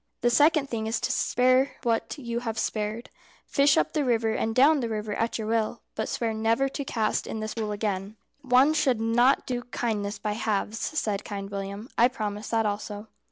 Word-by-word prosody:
"The 240 Hz, -, +3 dB
second 295 Hz, +3 st, +4 dB
thing 220 Hz, -3 st, -3 dB
is 225 Hz, -, 0 dB
to -, -, 0 dB
spare 255 Hz, +2 st, +2 dB
what 230 Hz, +4 st, -1 dB
you 235 Hz, -4 st, -3 dB
have 225 Hz, -2 st, -4 dB
spared. 215 Hz, +2 st, -3 dB, 0.3 s
Fish 280 Hz, 0 st, +3 dB
up -, -, +1 dB
the 300 Hz, -, +1 dB
river 230 Hz, -3 st, +1 dB
and 225 Hz, 0 st, -1 dB
down 290 Hz, +4 st, +5 dB
the 235 Hz, -3 st, -2 dB
river 215 Hz, -1 st, -3 dB
at 230 Hz, +2 st, -1 dB
your 220 Hz, -, -4 dB
will, 225 Hz, +1 st, -1 dB
but 220 Hz, -, -3 dB
swear 230 Hz, -2 st, -1 dB
never 225 Hz, +5 st, +1 dB
to 280 Hz, -, -4 dB
cast 220 Hz, -5 st, -1 dB
net -, -, -5 dB
in 220 Hz, -, -4 dB
this 215 Hz, 0 st, -4 dB
pool 215 Hz, -2 st, -3 dB
again." 205 Hz, -1 st, -3 dB, 0.3 s
"One 265 Hz, +2 st, +4 dB
should 275 Hz, -7 st, +2 dB
not 240 Hz, +4 st, +3 dB
do 245 Hz, -1 st, -2 dB
kindness 215 Hz, -4 st, -2 dB
by 210 Hz, -, -3 dB
halves," 215 Hz, 0 st, -1 dB
said 210 Hz, -10 st, -2 dB
Kind 200 Hz, -1 st, -6 dB
William. 200 Hz, +2 st, -5 dB
"I 240 Hz, -, +7 dB
promise 215 Hz, -4 st, -4 dB
that 225 Hz, -1 st, +1 dB
also." 210 Hz, +1 st, -4 dB
225 Hz, 205 wpm, -27 LUFS, 215-250 Hz, 0.3 s, I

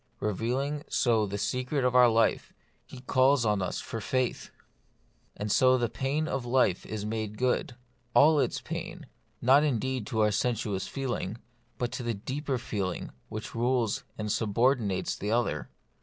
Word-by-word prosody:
Revealing 125 Hz, +8 st, -1 dB
so 115 Hz, -4 st, +2 dB
the 100 Hz, +1 st, -4 dB
secret 125 Hz, +5 st, -1 dB
of 125 Hz, 0 st, +1 dB
our 125 Hz, -1 st, +7 dB
life, 115 Hz, 0 st, +2 dB, 0.4 s
He 125 Hz, -, -11 dB
calls 130 Hz, 0 st, +3 dB
on 105 Hz, -2 st, +1 dB
us 90 Hz, -, -2 dB
for 115 Hz, -, -5 dB
faith. 130 Hz, +2 st, -1 dB, 0.9 s
And 105 Hz, 0 st, -3 dB
so 130 Hz, +3 st, +5 dB
the 120 Hz, -2 st, 0 dB
pain 145 Hz, +4 st, -1 dB
of 135 Hz, -4 st, -2 dB
life 120 Hz, -7 st, +1 dB
is 105 Hz, -1 st, -4 dB
made 110 Hz, -1 st, -3 dB
good 125 Hz, 0 st, 0 dB, 0.2 s
— 120 Hz, 0 st, -40 dB
all 150 Hz, +1 st, +6 dB
its -, -, 0 dB
pain; -, -, -6 dB, 0.4 s
not 135 Hz, +4 st, +6 dB
indeed 130 Hz, -4 st, -1 dB
to 110 Hz, -, 0 dB
our 105 Hz, 0 st, +4 dB
sensuous 105 Hz, -3 st, -1 dB
feeling, 120 Hz, -4 st, -3 dB, 0.4 s
but 120 Hz, -1 st, -2 dB
to -, -, -4 dB
that 115 Hz, -4 st, -4 dB
deeper 140 Hz, 0 st, -2 dB
feeling 100 Hz, -6 st, -3 dB, 0.2 s
which 110 Hz, 0 st, -6 dB
rules 120 Hz, -2 st, 0 dB
and 105 Hz, -1 st, -2 dB
subordinates 110 Hz, -2 st, +1 dB
the 105 Hz, -, -4 dB
other. 120 Hz, +1 st, 0 dB
120 Hz, 160 wpm, -29 LUFS, 105-130 Hz, 0.9 s, our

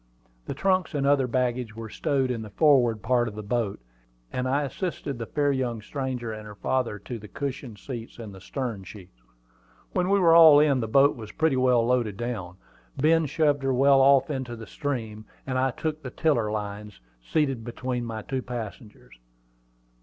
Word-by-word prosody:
The -, -, -4 dB
trunks 185 Hz, -4 st, +1 dB
and 140 Hz, -1 st, 0 dB
the 140 Hz, -, +5 dB
other 135 Hz, -3 st, +2 dB
baggage 125 Hz, -2 st, -1 dB
were 115 Hz, 0 st, -7 dB
stowed 135 Hz, +2 st, 0 dB
in 115 Hz, -2 st, -3 dB
the 110 Hz, -, -8 dB
forward 120 Hz, -4 st, +3 dB
part 120 Hz, -2 st, +2 dB
of 105 Hz, -, -6 dB
the 105 Hz, -, -6 dB
boat, 110 Hz, -2 st, -2 dB, 0.5 s
and 125 Hz, 0 st, -1 dB
I 140 Hz, +3 st, +1 dB
assisted 145 Hz, -3 st, -4 dB
the 115 Hz, -, -5 dB
fair 145 Hz, +2 st, +1 dB, 0.3 s
stranger 130 Hz, -4 st, -4 dB
and 110 Hz, 0 st, -8 dB
her 105 Hz, -, -10 dB
father 125 Hz, -1 st, -1 dB
to 115 Hz, +4 st, -7 dB
the 105 Hz, -, -11 dB
cushioned 135 Hz, -3 st, -5 dB
seats 120 Hz, -1 st, -8 dB
in 115 Hz, -3 st, -8 dB
the 95 Hz, -1 st, -12 dB
stern 115 Hz, -3 st, -4 dB
sheets. 90 Hz, -, -13 dB, 0.7 s
When 180 Hz, 0 st, +1 dB
we 200 Hz, -, +4 dB
were 170 Hz, -3 st, +5 dB
all 160 Hz, -3 st, +9 dB
in, 145 Hz, -3 st, +3 dB
the 115 Hz, -, -2 dB
boat 140 Hz, +5 st, +4 dB
was 110 Hz, -3 st, -9 dB
pretty 160 Hz, -3 st, +1 dB
well 125 Hz, -2 st, +3 dB
loaded 120 Hz, -5 st, 0 dB
down. 105 Hz, -7 st, -4 dB, 0.4 s
Ben 160 Hz, +2 st, +3 dB
shoved 145 Hz, 0 st, +1 dB
her 135 Hz, -1 st, 0 dB
well 135 Hz, +1 st, +5 dB
off 135 Hz, +1 st, +5 dB
into 130 Hz, -4 st, -4 dB
the 115 Hz, -1 st, -9 dB
stream, 110 Hz, -4 st, -4 dB, 0.2 s
and 130 Hz, -1 st, -1 dB
I 135 Hz, +1 st, +2 dB
took 155 Hz, +4 st, -4 dB
the 130 Hz, -, -6 dB
tiller 125 Hz, -8 st, +1 dB
lines, 105 Hz, -1 st, -5 dB, 0.2 s
seated 135 Hz, -, 0 dB
between 125 Hz, +1 st, -4 dB
my 110 Hz, -2 st, -5 dB
two 130 Hz, -1 st, -3 dB
passengers. 115 Hz, -, -8 dB
125 Hz, 190 wpm, -26 LUFS, 110-140 Hz, 0.7 s, all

